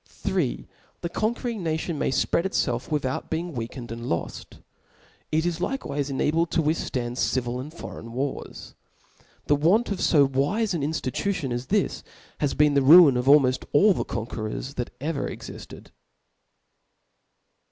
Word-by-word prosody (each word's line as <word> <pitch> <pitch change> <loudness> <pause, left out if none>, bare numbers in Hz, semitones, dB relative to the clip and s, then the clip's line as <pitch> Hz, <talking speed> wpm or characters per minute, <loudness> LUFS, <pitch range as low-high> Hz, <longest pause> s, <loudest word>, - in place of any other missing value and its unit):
3. - - -2 0.3
The 170 - -3
conquering 230 +2 -2
n^i* 160 -1 0
tion 160 -3 -4
nfiay 130 - +1
fpread 170 - +1
itfelf 125 -10 -1
without 140 -4 -2
being 165 +1 -3
weakened 120 0 -6
and 115 +1 -6
loft. 85 - -4 0.7
It 160 +2 +1
is 175 -1 -1
likcwife 145 - -2
enabled 155 +5 +1
to 165 - +2
withftand 125 -6 -2
civil 125 -1 0
and 140 +4 -7
foreign 115 -7 -9
wars. 135 +3 -5 0.7
The 145 - +3
want 185 +11 +2
of 200 - -2
fo 145 -4 +4
wife 145 +12 0
an 165 - -1
inftitution 145 +1 -2
as 120 +1 -4
this, 205 -1 0 0.4
has 145 -2 0
been 150 0 +4
the 140 - +4
ruin 150 0 +8
of 125 0 0
almpft 135 -3 +5
all 195 +8 +6
the - - -2
con 115 - -4
querors 115 +4 -5
that 125 -3 -4
ever 150 +1 -2
exiftcd. - - -10
145 Hz, 150 wpm, -25 LUFS, 130-170 Hz, 0.7 s, ruin